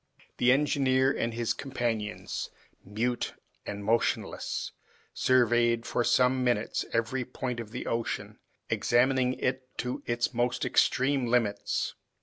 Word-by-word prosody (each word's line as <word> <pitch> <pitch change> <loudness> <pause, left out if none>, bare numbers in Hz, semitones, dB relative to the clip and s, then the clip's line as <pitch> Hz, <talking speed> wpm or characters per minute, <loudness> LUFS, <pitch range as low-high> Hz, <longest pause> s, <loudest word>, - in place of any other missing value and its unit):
The 125 +1 +4
engineer 135 -1 +3
and 115 - -1
his 115 0 -1
companions, 120 -6 -3 0.3
mute 115 +5 -2 0.3
and 100 0 -5
motionless, 115 +2 0 0.4
surveyed 120 -2 +3
for 120 - 0
some 125 +2 +3
minutes 120 -3 0
every 115 +3 0
point 125 -1 -4
of 115 -2 -6
the 125 +3 -6
ocean, 115 0 -3 0.3
examining 130 +1 +2
it 130 0 -3
to 125 0 -3
its 120 +2 0
most 120 +1 0
extreme 130 -1 +2
limits. 115 -4 0
120 Hz, 120 wpm, -29 LUFS, 115-130 Hz, 0.4 s, The